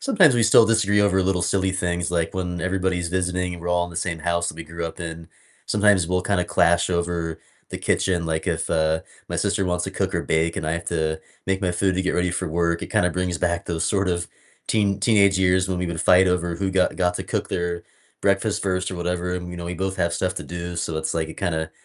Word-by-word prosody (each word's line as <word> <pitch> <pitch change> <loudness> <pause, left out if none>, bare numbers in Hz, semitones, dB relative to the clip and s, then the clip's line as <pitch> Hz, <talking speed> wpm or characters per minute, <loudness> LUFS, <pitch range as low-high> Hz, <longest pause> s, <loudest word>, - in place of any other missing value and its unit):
sometimes 195 - +4
we 120 - +3
still 115 0 +6
disagree 105 -3 +3
over 95 -2 +3
little 90 -1 +1
silly 95 +2 +1
things 90 -2 -1
like 85 -1 -1
when 90 -2 -3
everybody's 95 -1 -1
visiting 90 0 -1
and 85 - -10
we're 90 - -4
all 90 0 +2
in 90 - -8
the - - -12
same 85 -1 -2
house 85 +1 0
that - - -5
we 85 - -7
grew 85 +1 -5
up 80 - -8
in. 85 -1 -6 0.4
Sometimes 105 -4 +3
we'll 90 0 +1
kinda 95 -2 +1
clash 85 +1 +3
over 85 -2 -1 0.3
the - - -5
kitchen, 85 -3 0
like 80 -1 -1
if, 85 -2 -1
uh, 80 0 +2 0.3
my - - -3
sister 95 - +1
wants 90 -1 0
to - - -4
cook - - -1
or - - 0
bake 80 +1 0
and 75 - -3
I 80 - 0
have 85 +1 -3
to 80 -2 -1 0.3
make 95 0 0
my 90 - +1
food 95 +1 +1
to 95 - 0
get 95 - 0
ready 90 0 +1
for 90 0 -2
work, 85 +1 0
it - - -6
kinda 90 - +2
brings 90 0 -2
back 85 -1 -1
those 85 -2 -1
sort 100 -2 +1
of 85 -1 -1 0.4
teen 100 -3 +2
teenage 100 -2 +4
years 95 0 +3
when 95 -1 -1
we 90 - -1
would 85 -2 -3
fight 90 +2 +5
over 90 -1 0
who 95 +1 -1
got 95 -1 +1
got 90 -1 +1
to - - -3
cook - - -2
their 85 0 -2 0.4
breakfast 100 +1 +1
first 90 -1 -1
or 95 - -5
whatever, 90 +1 -2
and, 90 0 -5
you 90 - -7
know, 85 - -6
we 90 - -3
both 95 +2 -2
have 85 0 0
stuff 90 0 -1
to - - -5
do, 85 0 -5
so 85 -1 -2
it's 80 - -2
like 80 -1 -1
it 80 - -9
kinda 80 -4 -2
90 Hz, 255 wpm, -23 LUFS, 85-95 Hz, 0.4 s, still